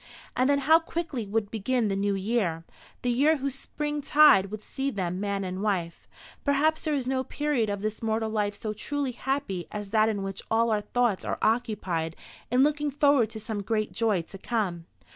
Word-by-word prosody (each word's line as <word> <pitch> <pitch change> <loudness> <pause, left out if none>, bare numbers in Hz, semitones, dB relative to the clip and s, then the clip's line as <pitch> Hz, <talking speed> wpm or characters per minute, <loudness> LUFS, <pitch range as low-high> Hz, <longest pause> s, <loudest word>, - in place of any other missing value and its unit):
And 255 +2 +2
then 285 - +4
how 320 +2 +7
quickly 325 -9 -4
would 205 0 -1
begin 230 +2 0
the 195 - 0
new 200 0 0
year, 190 -5 -1 0.4
the 245 - +1
year 295 +6 +3
whose 275 -1 -2
spring 295 +2 -4
tide 275 -9 +6
would 215 +1 -7
see 270 +1 -3
them 185 -6 -3
man 200 -1 -1
and 185 0 -4
wife! 180 -5 -2 0.4
Perhaps 305 +2 +2
there 305 -1 +1
is 265 -3 -1
no 260 0 0
period 280 -5 0
of 200 0 -3
this 215 0 -3
mortal 220 0 -1
life 205 -2 0
so 215 +1 -4
truly 280 +5 -2
happy 250 -8 -3
as 205 -1 -6
that 215 0 +4
in 205 -3 -2
which 195 -1 -5
all 230 +1 +2
our 210 -1 +1
thoughts 240 -3 0
are - - -2
occupied 205 -8 0 0.3
in 250 +3 +4
looking 295 0 +1
forward 280 -5 +3
to 220 -1 -7
some 215 -1 -4
great 215 +1 -1
joy 215 -7 +1
to 195 +3 -11
come. 185 -7 -2
220 Hz, 200 wpm, -27 LUFS, 200-270 Hz, 0.4 s, how